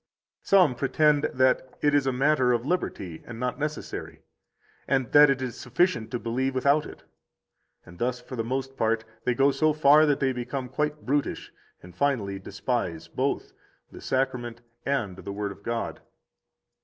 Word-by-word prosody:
Some 185 -9 +4
pretend 145 +3 +2
that 130 0 +1
it 145 -1 +3
is 145 -2 +3
a - - +3
matter 130 -1 +3
of 120 0 -1
liberty 95 - -3
and 115 -1 -9
not 125 +2 -2
necessary, 150 +1 -5 0.6
and 130 -4 0
that 145 0 +8
it 135 -1 +1
is 125 -3 -5
sufficient 125 -2 0
to 120 - -2
believe 130 +3 -2
without 140 +3 +2
it; - - -12 0.8
and 85 0 -14
thus 125 +1 -1
for 125 +1 -9
the 115 - -2
most 135 +3 -3
part 110 -1 0 0.2
they 125 - +1
go 135 +2 +4
so 155 +2 +2
far 155 +1 +6
that 145 -2 +2
they 135 -1 +1
become 125 +1 -4
quite 150 +3 -2
brutish, 145 +2 -1 0.3
and 90 0 -13
finally 105 -7 0
despise 95 -5 -3
both - - -2 0.4
the - - -11
Sacrament 125 -3 -2 0.3
and 115 -10 -1
the 100 - -7
Word 100 0 -3
of 100 - -12
God. 115 +2 -3
130 Hz, 165 wpm, -26 LUFS, 115-140 Hz, 0.8 s, that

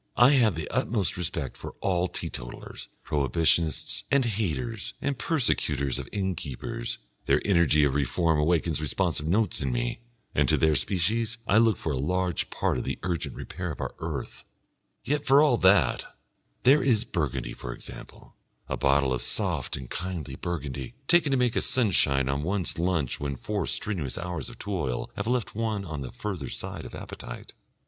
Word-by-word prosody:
I 120 +3 +8
have 115 - +4
the 80 -1 -4
utmost 105 -6 0
respect 80 -6 -3
for - - -8
all 90 -2 +1
Teetotalers, - - -6 0.2
Prohibitionists, 80 +1 +1
and 140 -2 +3
Haters 110 +1 -2
and 140 - -1
Persecutors 75 - 0
of 65 - -7
Innkeepers, 90 -11 -3 0.3
their 70 +2 +4
energy 85 -6 +4
of 70 -2 +3
reform 75 +4 +2
awakens 80 -1 +1
responsive 75 0 0
notes 100 0 +2
in 70 -2 0
me, - - -1 0.3
and - - +2
to - - +5
their 80 -1 +4
species 110 - 0
I 110 0 +5
look 115 -4 +4
for 80 - -2
a 65 - -1
large 90 +4 0
part - - 0
of - - -3
the - - -3
urgent 85 -4 -2
repair 90 +1 -5
of 70 - -8
our - - -3
earth; 80 -4 -5 0.6
yet 145 +3 0
for 135 +2 +7
all 145 -5 +5
that 95 - +4 0.6
There 140 +4 +6
is 120 -5 +3
Burgundy, 70 - -2
for - - -6
example, - - -10 0.3
a - - -2
bottle 70 -1 +3
of 65 - -2
soft - - -1
and 65 -2 -7
kindly 90 0 -4
Burgundy, 70 -7 -4
taken 175 -4 +5
to 135 - +3
make 125 -2 +2
a - - +2
sunshine 75 - +3
on 70 +1 0
one's 95 +1 0
lunch 85 -7 0
when 70 -1 -2
four 100 - -2
strenuous 85 -11 -1
hours 85 -5 -4
of - - -11
toil 85 -12 -2
have - - -3
left 125 -2 0
one 110 -2 -1
on 75 -4 -5
the 65 -3 -5
further 80 0 -4
side - - -5
of - - -8
appetite. - - -8
85 Hz, 170 wpm, -27 LUFS, 70-105 Hz, 0.6 s, I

